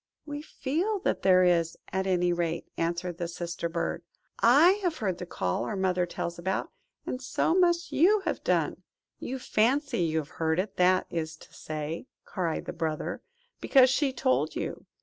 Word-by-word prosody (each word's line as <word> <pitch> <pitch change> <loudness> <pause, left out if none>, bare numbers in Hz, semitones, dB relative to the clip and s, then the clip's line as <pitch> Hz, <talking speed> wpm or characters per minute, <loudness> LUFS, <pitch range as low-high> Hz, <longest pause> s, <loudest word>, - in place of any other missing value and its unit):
"We 290 -1 -5
feel 315 +8 -1
that - - 0
there 185 -1 +5
is, 170 -2 +2 0.2
at 190 0 0
any 180 -1 +2
rate," 170 -1 -2
answered 170 +1 -2
the 170 - -2
Sister 170 0 -4
bird. 170 0 -2 0.4
"I 285 +10 +7
have 350 -4 -1
heard 190 -5 -2
the 180 - -6
call 90 - -1
our 120 - -3
mother 185 -2 +1
tells 170 0 -4
about, 190 +2 -2 0.3
and 255 - -4
so 270 - 0
must 345 -1 +2
you 400 +7 +4
have - - -3
done." - - 0 0.4
"You 265 - -4
fancy 255 +2 +1
you 160 -2 +1
have 155 -2 -2
heard 160 0 +2
it, 190 +2 -2
that 185 +1 +4
is 160 -1 -3
to - - -17
say," 155 - -5 0.2
cried 170 -5 -2
the - - -5
Brother; 160 -2 -3 0.4
"because 260 -2 +5
she 275 0 +2
told 260 +1 0
you. - - -5
185 Hz, 175 wpm, -28 LUFS, 170-265 Hz, 0.4 s, I